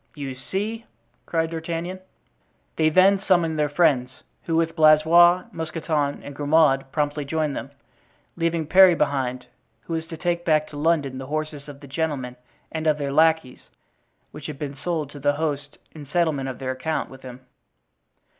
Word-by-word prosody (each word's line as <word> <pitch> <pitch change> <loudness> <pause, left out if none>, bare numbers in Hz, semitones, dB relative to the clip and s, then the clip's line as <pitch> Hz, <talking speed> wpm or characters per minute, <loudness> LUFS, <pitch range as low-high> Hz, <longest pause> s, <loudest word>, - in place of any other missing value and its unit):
"You 140 -3 -5
see!" 205 - -4 0.4
cried 165 -1 -1
D'Artagnan. 165 +3 -4 0.8
They 155 -1 +3
then 190 +4 +4
summoned 170 -5 +1
their 150 -1 +1
friends, 145 -5 +2 0.4
who, 165 - -1
with 165 0 +1
Blaisois, 165 +3 +6
Mousqueton 155 -3 -2
and 145 - -9
Grimaud, 145 -2 +2
promptly 145 -1 -1
joined 150 0 -2
them, - - -6 0.7
leaving 165 -1 -1
Parry 185 +2 +7
behind 130 -4 -1
them, - - -25 0.3
who 165 - -7
was 160 0 -3
to 165 -1 -8
take 175 +1 -1
back 155 -2 +2
to - - -11
London 145 -4 0
the 130 - -7
horses 155 -1 -4
of 140 -1 -11
the 140 - -11
gentlemen 140 -4 -3 0.4
and 160 0 -3
of 155 -1 +3
their 140 -2 -3
lackeys, 160 -4 +1 0.6
which 150 -1 -9
had 150 -3 -7
been 140 -1 -5
sold 155 -1 -3
to 145 - -10
the 145 +1 +2
host 145 -1 -3
in 150 -3 -11
settlement 150 -4 0
of 130 - -6
their 130 -1 -3
account 155 +5 -3
with 130 0 -12
him. 130 0 -10
155 Hz, 170 wpm, -23 LUFS, 140-165 Hz, 0.8 s, Parry